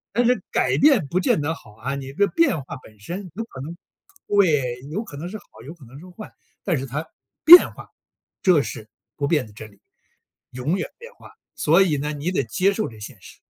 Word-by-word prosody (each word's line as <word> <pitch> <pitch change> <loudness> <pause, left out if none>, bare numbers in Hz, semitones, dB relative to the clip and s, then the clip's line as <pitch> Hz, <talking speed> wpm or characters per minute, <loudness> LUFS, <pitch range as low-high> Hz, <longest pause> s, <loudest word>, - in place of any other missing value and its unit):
但 240 0 +3
是 250 +1 +2
改 - - +1
变 265 - +4
不 180 +6 0
见 165 - +1
得 160 +3 -1
好 105 - -16
啊， 135 +5 -4
你 135 -1 -7
的 200 +6 +2
变 330 - +1
化 - - -8
本 110 -2 -18
身 175 - -7
有 225 - -3
可 130 - -11
能 165 +5 -7 0.5
对， 145 -12 +2
有 210 +7 -3
可 145 - -11
能 170 +4 -6
是 215 - -6
好， 205 - -18 0.2
有 155 - -8
可 160 -6 -18
能 130 +5 -13
是 180 - -13
坏。 210 +4 -11 0.3
但 170 -6 0
是 135 - -4
它 150 +5 -4 0.4
变 350 +3 +10
化， - - -13 0.5
这 175 -6 +4
是 110 -5 -7 0.3
不 140 -1 -1
变 150 -6 +1
的 - - -16
真 110 0 -11
理， 100 - -25 0.7
永 140 +9 -2
远 - - -3
变 480 +1 -13
化， - - -16 0.2
所 165 +5 +3
以 160 -6 +2
呢 150 +2 -3
你 150 +5 -3
得 140 - 0
接 190 - +1
受 215 +1 -2
这 110 -2 -14
现 105 -2 -10
实。 - - -15
155 Hz, 245 characters per minute, -22 LUFS, 135-195 Hz, 0.7 s, 变